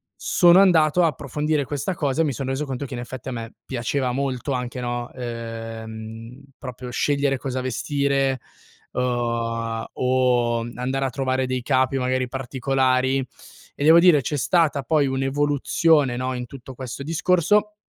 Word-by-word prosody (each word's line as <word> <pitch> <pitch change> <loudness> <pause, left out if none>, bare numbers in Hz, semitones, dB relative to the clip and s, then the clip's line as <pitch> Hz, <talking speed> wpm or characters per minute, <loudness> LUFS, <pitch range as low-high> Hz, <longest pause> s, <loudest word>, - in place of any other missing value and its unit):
sono 175 +1 +5
andato 170 -3 +4
a - - +5
approfondire 150 +1 -1
questa 150 +7 -3
cosa 145 0 0
e - - +3
mi 145 - 0
son 135 +3 -4
reso 135 +3 -2
conto 135 +1 -4
che 130 - -8
in - - -5
effetti 130 +2 -7
a - - -4
me 115 -1 -6
piaceva 130 +1 -1
molto 135 +1 -2
anche, 125 0 -3
no, 120 0 -3
ehm, 115 0 -7 0.2
proprio 125 -1 -7
scegliere 140 0 +1
cosa 130 0 -3
vestire, 135 +1 0 0.5
uhm, 115 -2 -1
o 125 -2 +2 0.2
andare 130 +2 -1
a - - 0
trovare 130 0 -1
dei 130 -1 -2
capi 130 0 +2
magari 130 0 0
particolari, 130 0 0 0.5
e 145 - -4
devo 160 +2 +7
dire 170 -5 +6
c'è 145 +4 -2
stata 155 -2 +2
poi 150 -4 +2
un'evoluzione, 140 +1 +2
no, 130 0 -2
in 125 0 -4
tutto 130 0 -11
questo 130 +1 -7
discorso 180 +6 +2
130 Hz, 155 wpm, -23 LUFS, 125-145 Hz, 0.5 s, devo